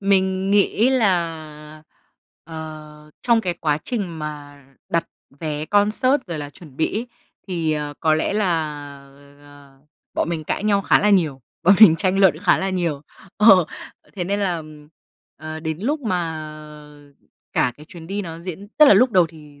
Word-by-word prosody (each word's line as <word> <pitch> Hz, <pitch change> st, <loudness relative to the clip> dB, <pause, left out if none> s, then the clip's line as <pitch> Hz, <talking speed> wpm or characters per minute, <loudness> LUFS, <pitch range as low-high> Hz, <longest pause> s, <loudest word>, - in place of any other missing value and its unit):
mình 190 Hz, -1 st, +1 dB
nghĩ 205 Hz, +4 st, +3 dB
là, 160 Hz, -9 st, -1 dB, 0.6 s
ờ, 155 Hz, -1 st, -10 dB
trong 235 Hz, -2 st, +3 dB
cái 180 Hz, -5 st, -2 dB
quá 150 Hz, -3 st, -1 dB
trình 195 Hz, -9 st, -3 dB
mà 145 Hz, -2 st, -8 dB, 0.2 s
đặt 170 Hz, -1 st, 0 dB, 0.4 s
vé 155 Hz, -2 st, -3 dB
concert 215 Hz, -, +2 dB
rồi 170 Hz, -4 st, -5 dB
là 145 Hz, -1 st, -6 dB
chuẩn 145 Hz, -3 st, -15 dB
bị 160 Hz, -, -1 dB
ấy, 240 Hz, -, -5 dB, 0.4 s
thì, 165 Hz, -4 st, -1 dB
ờ, 150 Hz, -1 st, -4 dB
có 155 Hz, -1 st, +3 dB
lẽ 155 Hz, +5 st, -1 dB
là, 210 Hz, -2 st, +1 dB, 0.9 s
à, 145 Hz, -1 st, -18 dB, 0.4 s
bọn -, -, -1 dB
mình 160 Hz, -2 st, -3 dB
cãi 200 Hz, -, -3 dB
nhau 200 Hz, -2 st, +2 dB
khá -, -, +4 dB
là 210 Hz, -, +2 dB
nhiều, 160 Hz, -9 st, +2 dB, 0.2 s
bọn 190 Hz, +4 st, +6 dB
mình 170 Hz, -7 st, +9 dB
tranh 190 Hz, +1 st, 0 dB
luận 185 Hz, -6 st, +4 dB
khá 185 Hz, +1 st, +3 dB
là 190 Hz, 0 st, -1 dB
nhiều. 170 Hz, -6 st, -2 dB, 0.3 s
Ờ, 195 Hz, -4 st, +7 dB, 0.5 s
thế 180 Hz, -3 st, -3 dB
nên 200 Hz, +3 st, -1 dB
là, 185 Hz, -4 st, 0 dB
ừm, 155 Hz, -2 st, -11 dB, 0.5 s
ờ, 155 Hz, +1 st, -7 dB
đến 160 Hz, -1 st, -4 dB
lúc 290 Hz, +8 st, -1 dB
mà 165 Hz, -, -3 dB, 1.0 s
cả 125 Hz, -, +1 dB
cái 150 Hz, +1 st, -14 dB
chuyến 165 Hz, -2 st, -11 dB
đi 200 Hz, +2 st, -3 dB
nó 165 Hz, -2 st, -7 dB
diễn 185 Hz, +3 st, -8 dB
tức 300 Hz, -2 st, +8 dB
là -, -, +8 dB
lúc 245 Hz, +5 st, +4 dB
đầu 180 Hz, -5 st, +4 dB
thì 150 Hz, -3 st, -16 dB
170 Hz, 175 wpm, -21 LUFS, 155-200 Hz, 1.0 s, mình